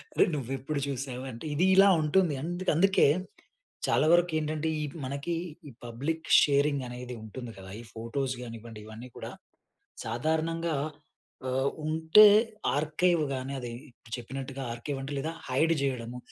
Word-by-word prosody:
అరేయ్! -, -, +4 dB
నువ్వు 135 Hz, -3 st, -4 dB
ఎప్పుడు 140 Hz, +3 st, -3 dB
చూసావు, 130 Hz, -1 st, -4 dB
అంటే 115 Hz, +6 st, -9 dB
ఇది 175 Hz, +5 st, +3 dB
ఇలా 195 Hz, +1 st, +8 dB
ఉంటుంది. 165 Hz, +1 st, +3 dB
అంద 175 Hz, +2 st, -4 dB
అందుకే 195 Hz, +1 st, +5 dB, 0.8 s
చాలా -, -, +3 dB
వరకేంటంటే, 160 Hz, -2 st, +1 dB
ఈ -, -, -1 dB, 0.2 s
మనకి 140 Hz, +5 st, -3 dB, 0.4 s
ఈ -, -, -11 dB
పబ్లిక్ 140 Hz, +8 st, -3 dB, 0.2 s
షేరింగ్ 140 Hz, -1 st, +2 dB
అనేది 125 Hz, 0 st, -7 dB
ఉంటుంది 120 Hz, +2 st, -7 dB
కదా! 95 Hz, 0 st, -10 dB
ఈ -, -, -11 dB
ఫోటోస్ 130 Hz, +4 st, -2 dB
గానివ్వండి, 115 Hz, -1 st, -9 dB
ఇవన్నీ 115 Hz, +3 st, -9 dB
కూడా -, -, -6 dB, 0.7 s
సాధారణంగా 160 Hz, +7 st, -1 dB, 0.7 s
ఆహ్, 130 Hz, +1 st, +1 dB, 0.2 s
ఉంటే 160 Hz, +6 st, +7 dB, 0.5 s
ఆర్కైవ్ 155 Hz, +3 st, +2 dB
గాని, 130 Hz, +1 st, -4 dB
అది 120 Hz, -2 st, -6 dB, 0.4 s
చెప్పినట్టుగా 135 Hz, +2 st, -6 dB
ఆర్కైవ్ 135 Hz, +4 st, -5 dB
అంటే 135 Hz, +2 st, -6 dB
లేదా, 155 Hz, +4 st, -2 dB, 0.2 s
హైడ్ 155 Hz, +6 st, +3 dB
చేయడము, 125 Hz, -3 st, -2 dB
140 Hz, 135 wpm, -29 LUFS, 125-160 Hz, 0.8 s, ఇలా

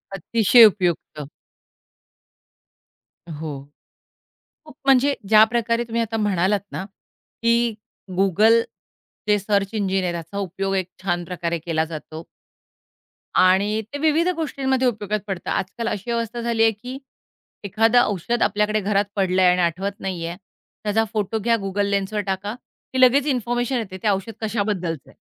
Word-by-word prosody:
अतिशय 225 Hz, +5 st, +6 dB
उपयुक्त. 175 Hz, -7 st, 0 dB, 2.0 s
हो. 150 Hz, -3 st, -6 dB, 1.0 s
खूप 305 Hz, -3 st, -15 dB
म्हणजे 270 Hz, +1 st, +4 dB
ज्या 215 Hz, 0 st, +8 dB
प्रकारे 230 Hz, +1 st, 0 dB
तुम्ही 230 Hz, 0 st, -1 dB
आता 225 Hz, 0 st, -3 dB
म्हणालात 200 Hz, -1 st, +1 dB
ना, 185 Hz, -, -4 dB, 0.6 s
की 235 Hz, -1 st, +2 dB, 0.4 s
Google 215 Hz, +5 st, +4 dB, 0.7 s
ते 210 Hz, 0 st, +4 dB
सर्च 200 Hz, -1 st, 0 dB
इंजिन 195 Hz, -2 st, 0 dB
आहे. 175 Hz, -, -1 dB
याचा 170 Hz, +3 st, -6 dB
उपयोग 195 Hz, 0 st, -2 dB
एक 185 Hz, -2 st, -2 dB
छानप्रकारे 175 Hz, -2 st, -2 dB
केला 160 Hz, -1 st, -1 dB
जातो. 160 Hz, 0 st, -8 dB, 1.2 s
आणि 195 Hz, +4 st, +3 dB
ते -, -, -2 dB
विविध 315 Hz, +2 st, +2 dB
गोष्टींमध्ये 265 Hz, -5 st, 0 dB
उपयोगात 215 Hz, -2 st, -1 dB
पडतं. 190 Hz, -3 st, -4 dB
आजकाल 210 Hz, +5 st, -3 dB
अशी 210 Hz, +3 st, -3 dB
अवस्था 235 Hz, 0 st, -2 dB
झालीये 225 Hz, -1 st, +2 dB
की 245 Hz, +5 st, -8 dB, 0.7 s
एखादं 225 Hz, +4 st, +3 dB
औषध 210 Hz, +5 st, -2 dB
आपल्याकडे 210 Hz, +1 st, +1 dB
घरात 200 Hz, +1 st, +1 dB
पडलंय 185 Hz, -2 st, +3 dB
आणि 180 Hz, 0 st, +1 dB
आठवत 190 Hz, +4 st, -2 dB
नाहीये. 170 Hz, -3 st, -4 dB, 0.5 s
त्याचा 215 Hz, +1 st, +1 dB
फोटो 215 Hz, +1 st, -1 dB
घ्या, 230 Hz, +2 st, +2 dB
Google 200 Hz, +1 st, -1 dB
Lensवर 200 Hz, +1 st, -1 dB
टाका, 195 Hz, +3 st, -3 dB, 0.4 s
की 260 Hz, -, +1 dB
लगेच 260 Hz, +3 st, +5 dB
इन्फॉर्मेशन 245 Hz, -1 st, -1 dB
येते 200 Hz, -5 st, -5 dB
ते -, -, 0 dB
औषध 200 Hz, +3 st, -1 dB
कशाबद्दलचंय. 200 Hz, -, -3 dB
205 Hz, 130 wpm, -22 LUFS, 185-230 Hz, 2.0 s, ज्या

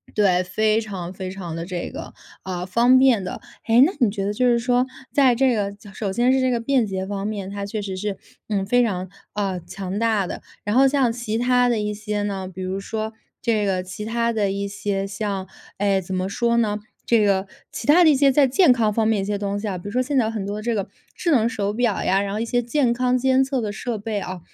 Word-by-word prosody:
对， 190 Hz, -4 st, +3 dB
非 215 Hz, +4 st, +1 dB
常， 190 Hz, -5 st, -5 dB
非 185 Hz, 0 st, -5 dB
常 185 Hz, -4 st, -6 dB
的 165 Hz, +1 st, -4 dB
这 180 Hz, -1 st, -4 dB
个， -, -, -8 dB, 0.3 s
嗯， 180 Hz, -1 st, -4 dB
方 240 Hz, +6 st, +4 dB
便 255 Hz, -6 st, +5 dB
的。 -, -, -6 dB, 0.2 s
哎， 235 Hz, +3 st, +6 dB
那 355 Hz, -, +1 dB
你 235 Hz, -5 st, +4 dB
觉 195 Hz, -1 st, -3 dB
得 200 Hz, -, 0 dB
就 250 Hz, +4 st, +1 dB
是 240 Hz, -1 st, +4 dB
说， 245 Hz, +1 st, +2 dB, 0.3 s
在 260 Hz, -4 st, +5 dB
这 260 Hz, 0 st, +3 dB
个 200 Hz, -2 st, -2 dB, 0.2 s
首 195 Hz, -2 st, -3 dB
先 245 Hz, +4 st, +3 dB
是 265 Hz, -, +3 dB
这 255 Hz, 0 st, +2 dB
个 240 Hz, -2 st, 0 dB
便 245 Hz, -2 st, +2 dB
捷 190 Hz, -1 st, -3 dB
方 200 Hz, 0 st, -3 dB
面， 200 Hz, -3 st, -4 dB
它 200 Hz, 0 st, -4 dB
确 210 Hz, +1 st, -4 dB
实 190 Hz, -2 st, -5 dB
是， 205 Hz, 0 st, -3 dB, 0.3 s
嗯， 200 Hz, -3 st, -1 dB
非 245 Hz, +4 st, +3 dB
常， 185 Hz, -5 st, -1 dB, 0.2 s
嗯， 195 Hz, -4 st, -2 dB
强 195 Hz, +1 st, -4 dB
大 220 Hz, -4 st, +2 dB
的。 -, -, -6 dB, 0.2 s
然 205 Hz, -, -1 dB
后 270 Hz, 0 st, +7 dB
像 265 Hz, -4 st, +2 dB
其 230 Hz, -2 st, -3 dB
它 250 Hz, 0 st, +3 dB
的 235 Hz, -2 st, +1 dB
一 210 Hz, 0 st, -2 dB
些 210 Hz, 0 st, -3 dB
呢， 195 Hz, -2 st, -3 dB
比 185 Hz, 0 st, -8 dB
如 185 Hz, +1 st, -3 dB
说 220 Hz, +2 st, -4 dB, 0.3 s
这 220 Hz, -4 st, +1 dB
个 185 Hz, -2 st, 0 dB
其 185 Hz, +3 st, -7 dB
它 235 Hz, +1 st, 0 dB
的 210 Hz, -3 st, 0 dB
一 200 Hz, +1 st, -2 dB
些 200 Hz, 0 st, -2 dB
像 195 Hz, -1 st, -3 dB, 0.3 s
哎， 200 Hz, -1 st, +1 dB
怎 185 Hz, +1 st, -5 dB
么 185 Hz, +1 st, -1 dB
说 235 Hz, +3 st, +1 dB
呢， 215 Hz, -3 st, +1 dB, 0.3 s
这 235 Hz, -, +4 dB
个 195 Hz, -1 st, +2 dB, 0.3 s
其 -, -, -5 dB
它 340 Hz, +4 st, +6 dB
的 -, -, +7 dB
一 290 Hz, -, +5 dB
些 275 Hz, 0 st, +4 dB
在 280 Hz, 0 st, +4 dB
健 285 Hz, +2 st, +5 dB
康 225 Hz, -3 st, +2 dB
方 225 Hz, 0 st, +1 dB
面 220 Hz, -2 st, +2 dB
的 195 Hz, -, -1 dB
一 -, -, -3 dB
些 205 Hz, 0 st, -1 dB
东 200 Hz, 0 st, -2 dB
西 215 Hz, -, -4 dB
啊， 190 Hz, -2 st, -2 dB
比 175 Hz, -, -11 dB
如 -, -, -7 dB
说 250 Hz, +3 st, +1 dB
现 275 Hz, +2 st, -1 dB
在 225 Hz, -3 st, +2 dB
很 210 Hz, -3 st, -4 dB
多 205 Hz, +1 st, -4 dB
这 235 Hz, +1 st, -1 dB
个 200 Hz, -3 st, -2 dB, 0.3 s
智 340 Hz, -, -1 dB
能 235 Hz, -4 st, +3 dB
手 205 Hz, -3 st, -2 dB
表 235 Hz, -3 st, 0 dB
呀， 190 Hz, +2 st, +2 dB
然 200 Hz, 0 st, -3 dB
后 215 Hz, -, -2 dB
一 230 Hz, -, -1 dB
些 245 Hz, +1 st, +1 dB
健 240 Hz, 0 st, +1 dB
康 250 Hz, +1 st, +1 dB
监 260 Hz, +1 st, +3 dB
测 265 Hz, -1 st, -1 dB
的 210 Hz, -2 st, -3 dB
设 235 Hz, +1 st, -3 dB
备 210 Hz, -1 st, -3 dB
啊， 180 Hz, 0 st, -5 dB
210 Hz, 275 characters per minute, -22 LUFS, 195-240 Hz, 0.3 s, 后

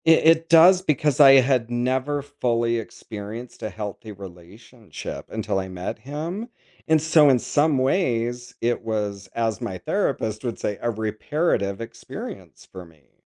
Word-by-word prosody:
I -, -, +8 dB
it 165 Hz, 0 st, +4 dB
does 175 Hz, +3 st, +7 dB
because 150 Hz, -5 st, 0 dB
I 135 Hz, -2 st, +9 dB
had 125 Hz, -3 st, +1 dB
never 130 Hz, +4 st, -1 dB
fully 120 Hz, -5 st, -1 dB
experienced 110 Hz, +2 st, -9 dB
a 110 Hz, -, -3 dB
healthy 105 Hz, +1 st, -7 dB
relationship 100 Hz, +4 st, -10 dB
until 95 Hz, -, -2 dB
I 95 Hz, -, -4 dB
met 90 Hz, 0 st, -5 dB
him, 165 Hz, -, -5 dB, 0.4 s
and 160 Hz, 0 st, +4 dB
so 155 Hz, -2 st, +5 dB
in 130 Hz, -, +5 dB
some 145 Hz, +3 st, +1 dB
ways, 120 Hz, -4 st, 0 dB
it 120 Hz, +1 st, 0 dB
was, 105 Hz, -3 st, -3 dB
as 115 Hz, -3 st, -1 dB
my -, -, -4 dB
therapist 110 Hz, +1 st, -2 dB
would 120 Hz, -3 st, -3 dB
say, 105 Hz, -, -2 dB
"a 120 Hz, -, 0 dB
reparative 110 Hz, -, -1 dB
experience" 115 Hz, 0 st, -9 dB
for 95 Hz, -1 st, -9 dB
me. 80 Hz, -4 st, -25 dB
120 Hz, 150 wpm, -23 LUFS, 105-145 Hz, 0.4 s, I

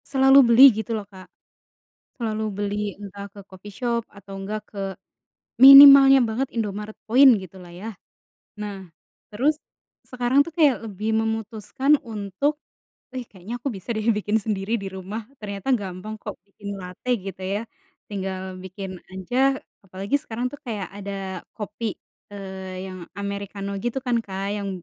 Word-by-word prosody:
Selalu 270 Hz, 0 st, +5 dB
beli 235 Hz, +2 st, +5 dB, 0.2 s
gitu 220 Hz, -, -8 dB
loh, 210 Hz, -, -6 dB
Kak. 185 Hz, -1 st, -13 dB, 0.9 s
Selalu 220 Hz, -3 st, -3 dB
beli 205 Hz, 0 st, -2 dB, 0.2 s
entah 200 Hz, 0 st, -8 dB
ke 200 Hz, -, -12 dB
coffee 195 Hz, +2 st, -12 dB
shop 235 Hz, -2 st, -1 dB
atau 200 Hz, 0 st, -12 dB
enggak, 210 Hz, +2 st, -4 dB
ke 200 Hz, -, -7 dB, 0.8 s
minimalnya 275 Hz, 0 st, +11 dB
banget 240 Hz, +5 st, -1 dB
Indomaret 210 Hz, -1 st, -4 dB
Point 260 Hz, +4 st, +7 dB
gitu 185 Hz, -1 st, -12 dB
lah 175 Hz, -, -13 dB
ya. 220 Hz, -, -6 dB, 0.7 s
Nah, 195 Hz, -3 st, -7 dB, 0.4 s
terus 270 Hz, +9 st, +1 dB, 0.6 s
sekarang 250 Hz, +2 st, +1 dB
tuh 335 Hz, -, -9 dB
kayak 285 Hz, -8 st, +3 dB
lebih 210 Hz, 0 st, -4 dB
memutuskan 225 Hz, +6 st, 0 dB
untuk, 215 Hz, +9 st, -2 dB, 0.5 s
"Ih, 255 Hz, -, -4 dB
kayaknya 190 Hz, +3 st, -9 dB
aku 275 Hz, -, -2 dB
bisa 190 Hz, -, -14 dB
deh 215 Hz, +1 st, -3 dB
bikin 210 Hz, +1 st, 0 dB
sendiri 205 Hz, 0 st, -3 dB
di 195 Hz, -, -5 dB
rumah." 190 Hz, +4 st, -6 dB, 0.2 s
Ternyata 200 Hz, +3 st, -5 dB
gampang 195 Hz, +2 st, -7 dB
kok 210 Hz, -, -6 dB
bikin 200 Hz, 0 st, -8 dB
late 180 Hz, +6 st, -9 dB, 0.2 s
gitu 190 Hz, -1 st, -7 dB
ya, 205 Hz, -, -1 dB, 0.5 s
tinggal 190 Hz, -2 st, -5 dB
bikin 190 Hz, 0 st, -7 dB, 0.2 s
aja. 255 Hz, +8 st, 0 dB, 0.2 s
Apalagi 195 Hz, +6 st, -3 dB
sekarang 245 Hz, -4 st, -5 dB
tuh 290 Hz, -, -9 dB
kayak 210 Hz, -6 st, -4 dB
ada 195 Hz, -2 st, -6 dB
kopi, 215 Hz, +1 st, -4 dB, 0.4 s
eee, 190 Hz, -1 st, -7 dB
yang 185 Hz, 0 st, -8 dB, 0.2 s
amerikano 200 Hz, 0 st, -5 dB
gitu 240 Hz, +2 st, -1 dB
kan, 245 Hz, -1 st, +1 dB
Kak, 195 Hz, 0 st, -4 dB
yang 200 Hz, -1 st, -4 dB
205 Hz, 145 wpm, -23 LUFS, 195-240 Hz, 0.9 s, minimalnya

